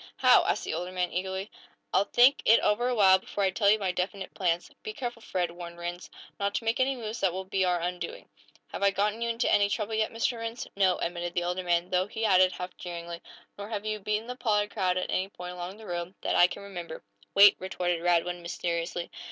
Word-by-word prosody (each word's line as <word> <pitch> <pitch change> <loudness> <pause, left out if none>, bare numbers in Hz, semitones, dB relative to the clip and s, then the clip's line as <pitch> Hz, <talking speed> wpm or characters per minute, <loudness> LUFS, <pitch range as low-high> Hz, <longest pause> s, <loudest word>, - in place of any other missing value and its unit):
"How?" - - +6
asked - - 0
the - - -3
older 175 +3 -4
man, 180 -1 -1
eagerly. 190 +2 -3 0.4
"I'll 200 - +4
think 250 +6 +5
it 225 - +6
over 230 +4 +2
a 250 - 0
while, 190 -3 +6
before 200 +1 -4
I 190 - +2
tell 200 +1 +2
you 215 - +5
my 195 -3 -1
definite 190 +2 -4
plans." 175 -2 -1
"Be 435 - -6
careful, 240 - -5
Fred," 180 -5 -2
warned 170 0 -9
Rhinds, 175 +1 -6 0.3
"not 200 0 -1
to - - -1
make 225 +2 0
any 265 +1 +2
moves 225 -2 -5
that 190 - +2
will 190 +2 -4
be 190 0 0
our 180 -1 +1
undoing!" 180 - -5 0.4
"Have - - -6
I 200 - +5
gotten 210 +3 -1
you 235 - 0
into 230 +1 0
any 200 0 +4
trouble 210 +1 -2
yet, 220 0 +1
Mr. 230 +1 -1
Rhinds?" 230 +1 -5
"No," 190 -2 +3
admitted 175 0 -3
the 175 - +1
older 180 +1 -2
man, 175 0 0
though 185 +1 +2
he 225 +1 -3
added, 185 -3 +5
half 180 0 -7
jeeringly: 170 -1 -7 0.4
"Nor 205 +1 -6
have 210 -2 -4
you 215 0 -2
beaten 210 +2 -2
the 250 +1 -6
Pollard 210 -4 0
crowd 185 -4 0
at 185 - -2
any 190 +1 0
point 180 -2 -8
along 180 +2 -7
the 220 - -12
road, 175 0 -4
that - - 0
I 175 - +7
can 190 - -8
remember." 175 -5 -8 0.3
"Wait!" 200 0 +9
retorted 175 -2 -2
Radwin, 175 0 +1
mysteriously. 170 0 -3
190 Hz, 235 wpm, -28 LUFS, 175-215 Hz, 0.4 s, Wait